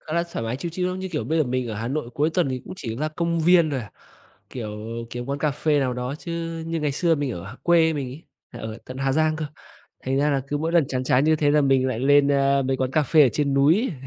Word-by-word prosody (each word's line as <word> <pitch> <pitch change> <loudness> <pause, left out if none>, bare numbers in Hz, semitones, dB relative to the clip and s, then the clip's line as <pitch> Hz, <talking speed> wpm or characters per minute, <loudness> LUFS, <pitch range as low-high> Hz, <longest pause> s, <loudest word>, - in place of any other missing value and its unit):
Khá 155 - -9
là 170 - +2
thoải 115 - -3
mái 115 +3 -2
chill, 170 +5 -5
chill, 180 +1 -1
ưm, 185 0 -4
như 190 0 -4
kiểu, 150 - -2
bây 160 +2 0
giờ 155 - +3
mình 125 -1 -2
ở 110 - -4
Hà 115 +3 -4
Nội 135 -2 -3
cuối 150 +3 +1
tuần 175 -4 +1
thì 130 -1 -3
cũng - - -8
chỉ 115 -8 -5
la 155 +3 -1
công 170 +1 -1
viên 170 -1 +5
thôi 135 -3 -1
à, 105 - -10 0.6
kiểu, 105 -4 -6 0.3
kiếm 120 0 -5
quán 140 +1 -3
cà 150 +1 +1
phê 145 +1 +1
nào 130 -2 0
đó. 125 +2 -3
Chứ 165 -1 -5
như 165 -1 -2
ngày 150 -2 0
xưa 165 +3 +2
mình 145 -3 -2
ở 85 -4 -7
h 105 +5 -9
quê 165 -2 +4
mình 140 -4 -3
ấy, 135 +6 -10 0.3
là 120 - -9
ở 110 0 -6
tận 130 - -8
Hà 135 0 0
Giang 155 +1 +2
cơ, 155 -1 -3 0.6
thành 135 +1 0
ra 145 +1 +2
là 135 -1 0
cứ 145 - -1
mỗi 160 +2 -2
lần 170 -5 +4
chán 130 -1 -2
chán 130 +2 +3
như 155 0 +4
thế 145 -1 +2
là 150 +1 +4
mình 135 -2 +3
lại 125 - -2
lên, 140 +1 +5
a, 140 0 +3
mấy 130 0 0
quán 130 0 -1
cà 155 +2 +2
phê 150 +3 +5
ở 135 - +6
trên 140 -2 0
núi, 165 - +3
145 Hz, 300 wpm, -24 LUFS, 130-160 Hz, 0.6 s, ở